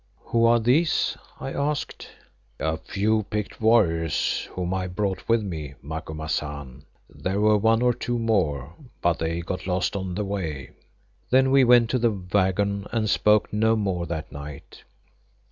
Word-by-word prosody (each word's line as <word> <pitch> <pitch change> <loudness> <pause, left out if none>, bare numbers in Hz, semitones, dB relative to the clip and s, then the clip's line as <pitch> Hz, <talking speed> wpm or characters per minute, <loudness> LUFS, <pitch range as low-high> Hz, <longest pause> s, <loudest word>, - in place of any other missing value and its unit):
"Who 115 0 +1
are 120 0 +5
these?" 135 +9 +2 0.2
I 135 - -5
asked. 145 +1 -3 0.5
"A 80 0 -1
few 110 +5 0
picked 105 0 -4
warriors 85 -8 +2
whom 90 0 -2
I 95 -1 -1
brought 95 +2 -3
with 115 -1 +3
me, 80 -8 -6
Macumazahn. 75 -3 -5 0.2
There 95 +2 -3
were 105 0 +4
one 115 +3 +3
or 125 0 +4
two 120 +1 -3
more, 80 - 0 0.3
but 85 -3 +2
they 80 +1 -1
got 90 +2 -5
lost 90 +1 0
on 95 -2 -3
the 105 +1 -2
way." 80 -10 -4 0.6
Then 130 +1 +4
we 135 -1 +6
went 120 -2 +5
to 125 - +1
the 120 0 +3
waggon 100 +1 0
and 110 -2 0
spoke 105 0 +3
no 110 +1 +3
more 95 -5 -1
that 80 -1 -5
night. 70 0 -10
95 Hz, 155 wpm, -25 LUFS, 80-115 Hz, 0.6 s, we